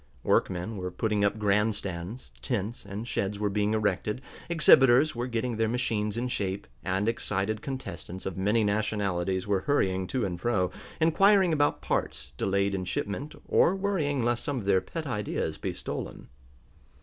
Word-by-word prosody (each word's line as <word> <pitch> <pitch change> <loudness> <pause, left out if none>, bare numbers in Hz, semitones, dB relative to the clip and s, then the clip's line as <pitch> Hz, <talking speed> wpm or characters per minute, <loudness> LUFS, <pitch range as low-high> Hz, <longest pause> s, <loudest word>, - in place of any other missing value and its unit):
Workmen 95 +4 +1
were 90 -1 -3
putting 105 +3 0
up 100 +1 +2
grand 105 +1 +2
stands, 95 +4 -6
tents 115 -3 -3
and 105 +4 -5
sheds 100 -4 -1
were 105 -1 0
being 105 +1 +1
erected, 105 +1 0 0.3
exhibitors 145 -4 +6
were 120 +1 -2
getting 115 -1 -2
their 110 0 +1
machines 110 -3 -1
in 120 +2 -1
shape, 100 -4 -2 0.2
and 95 +5 0
excited 105 -2 -1
contestants 130 -9 -6
of 95 - -3
many 105 +4 +2
nationalities 100 -3 0
were 100 -2 +1
hurrying 95 -7 +1
to 125 0 -1
and 90 -2 -4
fro, 100 -6 +1 0.3
inquiring 185 +3 +5
about 145 -1 +1
parts 65 +1 -2
delayed 100 +5 +1
in 95 -1 -2
shipment, 100 +10 -3
or 185 - +4
worrying 165 -10 0
lest 120 0 +1
some 145 -2 -2
of 110 - -4
their 95 -2 +4
pet 165 -2 -6
ideas 105 -7 -2
be - - -2
stolen. - - -6
105 Hz, 160 wpm, -28 LUFS, 95-125 Hz, 0.3 s, exhibitors